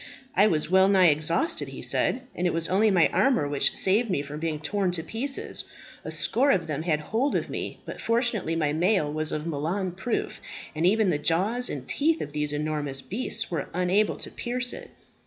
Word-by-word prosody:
"I 205 +3 +5
was 155 -7 0
well 190 0 +6
nigh 190 -3 +5
exhausted," 155 - 0
he - - -9
said, 255 - +2
"and 180 - -1
it 175 - -1
was 165 0 +1
only 210 +4 +3
my 180 -5 +4
armour 255 - +2
which 145 -1 +1
saved 210 +5 +2
me 145 -7 0
from 145 +1 -7
being 160 -2 -2
torn 195 +4 0
to 165 -2 0
pieces. 270 - -3 0.4
A - - -6
score 260 +5 +2
of 180 -10 +2
them 155 -1 -3
had 160 -2 0
hold 230 - -1
of - - -2
me; - - -5
but, - - -8
fortunately, 230 -8 0
my 150 -3 0
mail 170 -2 +1
was 155 0 -2
of 155 0 -3
Milan 170 +5 -2
proof, 190 +7 -3 0.3
and 160 +2 +1
even 210 -1 +3
the 150 - 0
jaws 200 +11 0
and 130 -3 -6
teeth 315 +3 +1
of 145 - -6
these 150 -1 0
enormous 150 -2 -2
beasts 225 0 -2
were 160 -4 -3
unable 185 +4 +1
to - - -4
pierce 245 +1 0
it." - - -9
180 Hz, 205 wpm, -26 LUFS, 155-220 Hz, 0.4 s, well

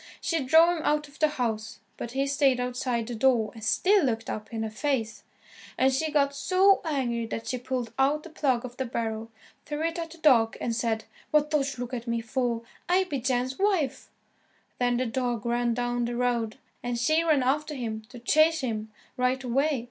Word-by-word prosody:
She 330 -4 -1
drove 325 +6 +6
him 315 - -5
out 300 0 +1
of 285 - -18
the 310 - +5
house, 225 -7 -3 0.2
but 235 - -6
he 270 +1 +1
stayed 275 -2 +2
outside 250 -1 -1
the 240 - -5
door 230 -2 +2
and 225 - -11
still 365 - +3
looked 225 -4 -1
up 215 0 -6
in 225 -1 -3
her 220 - -2
face. 230 -2 -2 0.6
And 265 +1 +3
she 315 +4 0
got 280 -2 +2
so 370 +7 +4
angry 250 -7 -1
that 225 - -5
she 255 - -2
pulled 250 -2 -3
out 290 +3 +2
the 340 - -11
plug 260 -6 0
of 245 0 -9
the 265 - -1
barrel, 225 -2 -3 0.4
threw 295 +1 -3
it 330 +1 -1
at 330 -1 -4
the 335 - -12
dog, 250 -8 +4
and 230 - -2
said, 225 -1 -1 0.3
"What 300 0 +2
dost 275 -3 0
look 245 +1 -5
at 240 -1 -4
me 235 0 0
for? 230 0 -1 0.3
I 370 +2 +4
be 295 -7 -3
Jan's 255 +2 -1
wife." 380 -8 0 0.7
Then 245 -1 +2
the 255 - 0
dog 240 -2 -2
ran 240 0 +1
down 245 0 -1
the 240 0 -3
road, 235 -2 0 0.2
and 245 -1 -2
she 310 +8 +2
ran 305 -5 +3
after 295 +4 0
him 225 -4 -4
to 250 - -11
chase 310 +6 +3
him 220 -4 -3 0.3
right 255 +1 +1
away. 270 +3 +1
255 Hz, 205 wpm, -27 LUFS, 235-295 Hz, 0.7 s, drove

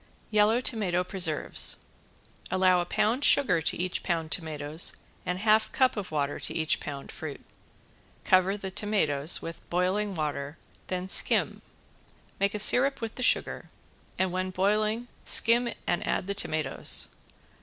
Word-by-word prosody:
~YELLOW 215 +3 +3
TOMATO 195 -8 -1
PRESERVES~ 180 -5 0 0.7
Allow 185 -1 +3
a - - -3
pound 235 +10 0
sugar 215 -16 +3
to - - -1
each 180 +1 -2
pound 165 -3 -2
tomatoes 155 -1 0 0.3
and 180 +1 -1
half 215 +2 +3
cup 260 -1 +2
of 205 -4 -5
water 145 -2 -2
to - - -5
each 160 -1 +1
pound 140 -1 -7
fruit. 155 -4 -8 0.8
Cover 185 +2 +3
the 195 -2 -6
tomatoes 175 -8 +1
with 165 0 -7
boiling 190 +3 0
water, 150 -1 -3 0.3
then 185 0 -3
skim. - - +1 0.8
Make 200 +1 +1
a - - 0
syrup 255 +6 +5
with 225 -1 -5
the - - -7
sugar, 250 - 0 0.5
and 190 -1 0
when 185 +1 -2
boiling 215 +5 0 0.2
skim 235 +1 +4 0.2
and 175 - -1
add - - 0
the 200 - -2
tomatoes. 155 -7 -2
185 Hz, 145 wpm, -28 LUFS, 160-210 Hz, 0.8 s, syrup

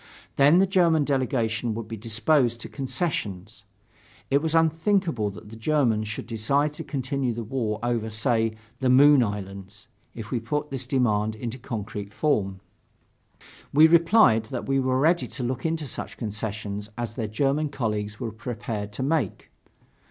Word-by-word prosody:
Then 145 +5 +6
the 190 - +5
German 170 -5 +3
delegation 120 -5 0
would 115 -1 -5
be 115 - -5
disposed 120 +3 +1
to - - -6
concessions.... 110 - -3 0.7
It 140 +1 +4
was 160 0 -1
unthinkable 165 - +2
that 100 +1 -11
the 110 - -10
Germans 115 -3 +1
should 105 - -5
decide 140 +6 0
to 160 - -7
continue 135 -3 -2
the 115 - -4
war 110 -2 -2
over, 120 -2 -1
say, 110 0 0 0.2
the 130 -2 +1
Moon 140 +2 +7
Islands, 100 -1 -5 0.3
if 110 -2 -8
you 120 - -1
put 150 +6 -3
this 130 -2 -3
demand 110 -5 +1
in 115 +2 -4
concrete 110 -4 -6
form. 100 -11 0 1.1
We 150 +3 +7
replied 170 - +5
that 120 +2 -5
we 135 0 +2
were 130 0 +1
ready 170 +5 +3
to 130 - -6
look 125 +5 -2
into 160 -1 -2
such 135 - -5
concessions 105 -1 -4
as 120 -2 -4
their 115 -2 -3
German 140 +7 0
colleagues 105 -6 -3
were 115 - -3
prepared 110 -2 -5
to 130 - -3
make. 140 - -1
120 Hz, 160 wpm, -25 LUFS, 110-145 Hz, 1.1 s, Moon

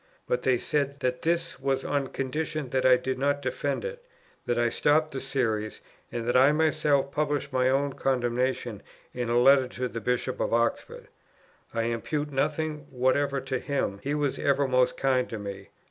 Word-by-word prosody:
But 125 - 0
they 130 -1 +2
said 140 +1 -1
that 125 0 -1
this 170 +1 -1
was 135 0 -1
on 140 -2 0
condition 150 +1 -3
that 130 -1 +2
I 130 -1 +7
did 130 +1 -3
not 140 +1 +1
defend 145 - -2
it, 485 0 -6 0.4
that 120 - +1
I 120 0 +3
stopped 155 +5 +2
the 135 - -4
series, 110 -6 -1 0.3
and 120 -1 -4
that 120 - +1
I 130 +3 +6
myself 150 -3 +2
published 145 -2 -1
my 130 0 +3
own 140 +1 +1
condemnation 125 -3 -1 0.3
in 120 -2 -3
a 120 - +2
letter 135 +1 +6
to 125 0 -3
the 115 -1 -6
Bishop 125 +2 -1
of - - +1
Oxford. 115 0 -1 0.6
I 115 - -1
impute 145 +6 -2
nothing 150 +1 -1
whatever 140 +2 +1
to 130 -1 -2
him, 130 -9 -2
he 145 +2 -2
was 145 -2 -1
ever 140 0 +2
most 125 -1 +2
kind 130 -2 +1
to 115 - -4
me. 100 -1 -7
135 Hz, 180 wpm, -27 LUFS, 125-145 Hz, 0.6 s, I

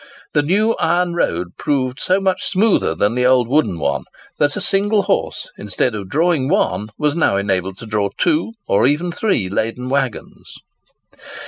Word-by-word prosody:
The 150 - +3
new 200 +9 +2
iron 175 +2 +1
road 90 - -2
proved 130 -2 -1
so 185 +1 +2
much 190 -1 0
smoother 200 - +2
than 105 +6 +1
the 125 +1 +2
old 125 -2 +3
wooden 135 - +1
one, 80 - -1 0.3
that 145 0 +2
a - - -2
single 205 +1 +2
horse, - - -2
instead 125 - -1
of 100 -3 -6
drawing 155 - +1
one, 95 -2 0
was 150 -1 +1
now 155 -11 +2
enabled 95 -1 -1
to 115 - -10
draw 105 -2 -1
two, 310 -8 +1
or 100 - +3
even 160 +5 0
three, 190 - 0
laden 115 +6 -2
waggons. 135 -4 -3
140 Hz, 165 wpm, -19 LUFS, 105-180 Hz, 0.3 s, The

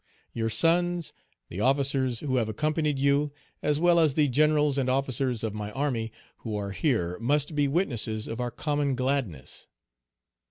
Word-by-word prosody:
Your 115 -1 -1
sons, 170 +5 +1 0.4
the 90 - -5
officers 135 -1 +2
who 130 -3 -1
have 115 -3 0
accompanied 150 +4 0
you, 140 +2 +2 0.3
as 150 0 +1
well 175 0 +4
as 155 -4 +3
the 150 -2 +3
generals 150 +1 +2
and 130 -1 0
officers 130 -2 0
of 110 -2 -2
my 105 -1 -5
army, 125 -5 -2 0.3
who 110 -2 -5
are 100 -1 -4
here, 100 - -1
must 145 +6 0
be 145 -1 +2
witnesses 120 - 0
of 115 - -5
our 120 - -1
common 145 +2 -1
gladness." 125 - -3
135 Hz, 160 wpm, -27 LUFS, 115-150 Hz, 0.4 s, well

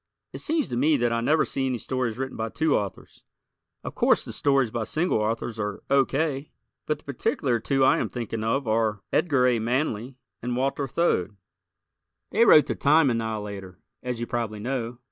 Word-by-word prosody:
It - - -6
seems 320 -2 0
to 120 - -2
me 150 +4 +3
that 120 -2 +1
I 115 - 0
never 155 +6 +3
see 135 -1 -1
any 130 -1 -1
stories 125 -2 -2
written 135 0 -4
by 110 0 -3
two 160 +5 +1
authors. 100 -3 -5 0.6
Of - - -6
course - - +2
the - - -7
stories 135 -5 +2
by 115 -1 -2
single 160 -3 0
authors 115 +1 -2
are 105 -1 -4
O. 140 -1 +5
K., 140 -1 -2 0.4
but 150 - 0
the - - -19
particular 125 -2 -1
two 135 +4 +1
I - - +4
am - - -2
thinking 115 -2 -4
of 115 +3 0
are 110 -2 0
Edgar 140 -7 +3
A. 125 -2 +3
Manley 125 +1 -1 0.3
and 120 0 -2
Walter 135 +2 -1
Thode. 110 - 0 0.9
They 230 +2 +4
wrote 150 - +7
"The - - -2
Time 145 -1 +4
Annihilator," 105 -5 -4 0.2
as 125 -2 -4
you 120 - -2
probably 115 -3 -3
know. 120 0 -3
125 Hz, 190 wpm, -25 LUFS, 110-140 Hz, 0.9 s, wrote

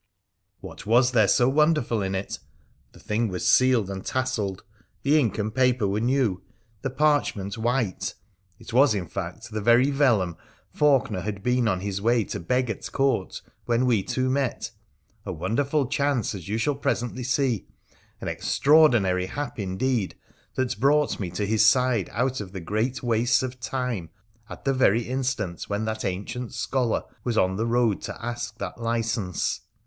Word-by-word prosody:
What - - -10
was 125 +3 +4
there 110 -5 +4
so 120 +5 +4
wonderful 150 -5 +2
in 95 0 -2
it? 95 +1 -4 0.5
The - - -17
thing 110 +2 -1
was 90 -3 -3
sealed 130 -5 +4
and 95 -1 -6
tasselled, 110 -8 -2 0.4
the 150 +3 +4
ink 120 -6 0
and 105 0 -2
paper 125 -4 +2
were 100 +2 0
new, 120 -5 +1 0.4
the 135 - -2
parchment 130 -9 +1
white; 115 -3 -1 0.4
it 115 - -11
was, 130 -2 +5
in 95 -3 -2
fact, 100 +7 -6
the 110 0 -3
very 120 +6 +4
vellum 115 - +2 0.4
Faulkener 135 -10 +2
had 100 0 -5
been 125 0 +2
on 95 -3 0
his 100 0 -3
way 115 +1 +3
to - - -5
beg 125 +8 0
at 105 - -7
Court 135 -9 0 0.2
when 120 +1 +2
we 115 -5 +3
two 130 +6 -1
met 135 -1 -1 0.3
— - - -46 0.2
a - - -5
wonderful 135 - 0
chance, 140 -3 0
as 90 -5 -8
you 110 - 0
shall 145 +6 +1
presently 125 -2 -2
see, 125 -4 0 0.5
an - - -6
extraordinary 120 -12 +3
hap 145 +2 -5
indeed 100 +2 -1 0.4
that 130 -5 -1
brought 145 +3 +2
me 95 -4 -3
to 90 +4 -2
his 110 +1 +3
side 125 -2 +3
out 125 +2 -1
of 95 -2 -9
the 95 - -5
great 110 +10 -2
wastes 120 +2 +2
of 130 0 -5
time 120 -7 -3 0.4
at - - -10
the 135 - +2
very 120 -3 +3
instant 125 -8 -2
when 105 +2 -1
that 110 0 -3
ancient 100 +6 -4
scholar 125 -4 0 0.2
was 120 -3 -1
on 95 -1 +2
the 110 +4 -1
road 115 -3 +2
to - - -6
ask 120 -2 -4
that 120 - -6
license. 115 -5 -1
115 Hz, 170 wpm, -25 LUFS, 100-130 Hz, 0.5 s, was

